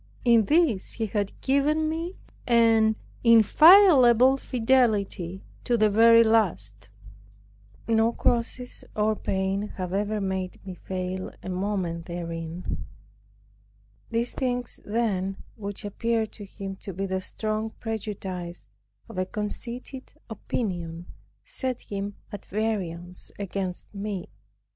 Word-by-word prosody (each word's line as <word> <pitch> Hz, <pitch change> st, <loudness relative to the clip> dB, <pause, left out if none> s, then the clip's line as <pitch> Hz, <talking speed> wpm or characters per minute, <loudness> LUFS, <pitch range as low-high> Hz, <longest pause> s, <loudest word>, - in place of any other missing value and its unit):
In 230 Hz, -3 st, +5 dB
this 295 Hz, -, +2 dB
he 225 Hz, -, -2 dB
had 205 Hz, -2 st, -3 dB
given 295 Hz, +3 st, +2 dB
me 330 Hz, +4 st, -3 dB, 0.3 s
an 225 Hz, -2 st, +4 dB, 0.3 s
inviolable 255 Hz, -, +7 dB
fidelity 225 Hz, -8 st, +1 dB, 0.2 s
to 240 Hz, -, +1 dB
the 215 Hz, -1 st, +3 dB
very 230 Hz, +2 st, +7 dB
last. 105 Hz, -, 0 dB, 1.0 s
No 225 Hz, 0 st, +3 dB
crosses 245 Hz, +1 st, -1 dB
or 215 Hz, 0 st, +2 dB
pains 195 Hz, +1 st, -1 dB
have 185 Hz, -1 st, -4 dB
ever 210 Hz, +2 st, 0 dB
made 190 Hz, -2 st, -3 dB
me 190 Hz, -, -6 dB
fail 185 Hz, +1 st, -4 dB
a -, -, -6 dB
moment 180 Hz, -3 st, -2 dB
therein. 170 Hz, 0 st, -5 dB, 1.3 s
These 230 Hz, +1 st, -1 dB
things 245 Hz, -2 st, -2 dB
then, 200 Hz, -4 st, -1 dB, 0.2 s
which 205 Hz, -2 st, -6 dB
appeared 225 Hz, +1 st, -1 dB
to 205 Hz, -, -10 dB
him 195 Hz, 0 st, -7 dB
to 195 Hz, -, -8 dB
be 195 Hz, +3 st, -3 dB
the 190 Hz, -1 st, -2 dB
strong 215 Hz, +2 st, -3 dB
prejudice 190 Hz, -5 st, -5 dB, 0.4 s
of -, -, -6 dB
a 185 Hz, -, +1 dB
conceited 240 Hz, +5 st, -5 dB, 0.2 s
opinion, 175 Hz, -6 st, -4 dB, 0.4 s
set 255 Hz, -2 st, -3 dB
him 200 Hz, 0 st, -5 dB, 0.2 s
at 205 Hz, -, -8 dB
variance 180 Hz, -5 st, -3 dB
against 195 Hz, -2 st, -4 dB
me. 200 Hz, -2 st, -4 dB
210 Hz, 115 wpm, -26 LUFS, 190-230 Hz, 1.3 s, inviolable